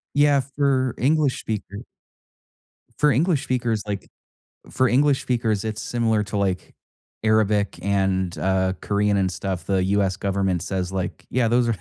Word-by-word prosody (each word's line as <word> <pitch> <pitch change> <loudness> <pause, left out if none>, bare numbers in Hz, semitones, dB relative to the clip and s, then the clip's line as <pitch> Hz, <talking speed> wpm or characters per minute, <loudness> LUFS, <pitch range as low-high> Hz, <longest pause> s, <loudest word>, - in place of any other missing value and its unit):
Yeah, 145 -1 +4
for 130 -3 +1
English 145 0 +2
speaker 100 -2 -5 1.1
for 150 - +4
English 150 +3 +2
speakers, 120 -5 -1
like, 100 -1 -4 0.6
for 130 - +2
English 140 +2 +3
speakers, 115 -5 0
it's 110 -1 -4
similar 115 -3 0
to, 100 0 -4
like, 95 -2 -1 0.5
Arabic 105 -3 +2
and, 95 -2 0
uh, 95 0 +1
Korean 105 0 +1
and 95 -2 +1
stuff. 95 -1 -4
The 95 -2 +1
US 95 -1 +1
government 95 -3 -1
says 95 -1 -3
like 95 -2 -4
yeah, 125 -2 +1
those 120 +1 +2
are 115 - +1
105 Hz, 145 wpm, -23 LUFS, 95-125 Hz, 1.1 s, Yeah